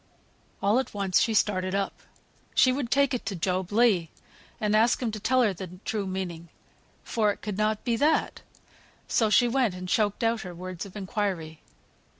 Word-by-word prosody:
All 205 +5 +4
at 260 - -4
once 195 -2 +2
she 225 - +1
started 185 -2 +1
up. 200 0 -1 0.6
She 255 - +5
would 255 -2 -2
take 280 +1 +3
it 250 - -2
to 200 - -2
Job 185 +1 -1
Legh 205 -6 +3 0.5
and 210 0 +1
ask 225 +2 +4
him 240 -3 -1
to 215 - -5
tell 255 +5 +3
her 210 -4 +2
the 180 0 -9
true 205 -3 -2
meaning, 175 -3 -5 0.5
for 215 -3 +1
it - - -9
could 210 -2 -3
not 215 0 0
be 235 -2 +1
that. 305 +6 +1 0.7
So 220 -2 +2
she 240 +3 +5
went, 240 -5 +1
and 185 0 -7
choked 205 +3 +1
out 225 0 +1
her 180 -2 -8
words 185 +1 -6
of 195 - -16
inquiry. 190 -6 -3
205 Hz, 185 wpm, -27 LUFS, 185-230 Hz, 0.7 s, She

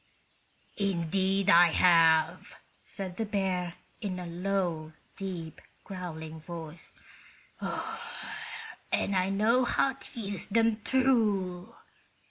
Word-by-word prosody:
"Indeed 195 +1 +1
I 175 +1 +8
have," 165 -1 +4 0.2
said 185 -3 -7
the 225 - -1
bear, 185 -4 -1 0.3
in 195 -4 -3
a 180 - -5
low, 175 -3 -2 0.2
deep, 175 -5 -6 0.2
growling 160 -4 -7
voice. 165 0 -9 0.7
"And 200 - -4
I 185 0 +2
know 220 +6 +3
how 265 +2 +2
to 245 -1 -8
use 200 -4 -4
them, 225 +1 +3
too. 210 -8 +1
185 Hz, 95 wpm, -30 LUFS, 170-200 Hz, 0.7 s, I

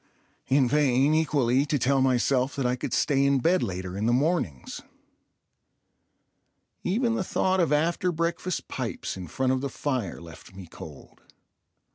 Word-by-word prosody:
In 135 -1 +3
vain, 140 0 +3
equally, 140 -5 +2
to 145 - +1
tell 135 +1 +2
myself 130 +1 +1
that 135 - -2
I 125 0 +1
could 125 - -5
stay 135 -1 +2
in 140 0 +3
bed 175 +8 +2
later 95 0 -4
in 105 +3 -1
the - - +3
mornings. 125 - -1 2.0
Even 230 +5 0
the 210 - -1
thought 190 +1 0
of 165 -5 +2
after 170 +4 +1
breakfast 170 +2 -2
pipes - - -4
in 90 -2 -7
front 130 - -1
of 130 - -1
the 140 - -3
fire 125 - -3
left 85 +3 -13
me 95 -1 -9
cold. 80 -3 -13
135 Hz, 155 wpm, -26 LUFS, 120-155 Hz, 2.0 s, In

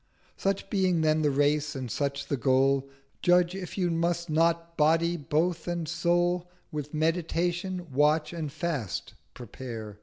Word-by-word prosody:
Such 195 0 -1
being 185 -4 +2
then 155 0 +3
the 150 - +3
Race 145 +1 +1
and 130 -4 -4
such 140 +1 -2
the 140 - -1
Goal, 135 +1 +2 0.3
Judge 180 0 +4
if 190 -2 -6
you 180 -3 +1
must 170 0 -1
not 165 +1 +1
Body 165 +3 +3
both 160 +3 -1
and 170 -2 -2
Soul 175 +1 +1 0.2
With 150 -2 -5
Meditation, 175 +3 -1
Watch 150 +3 +2
and 160 -4 -4
Fast 150 - -3 0.2
prepare. 115 -3 -8
160 Hz, 145 wpm, -28 LUFS, 145-175 Hz, 0.3 s, Judge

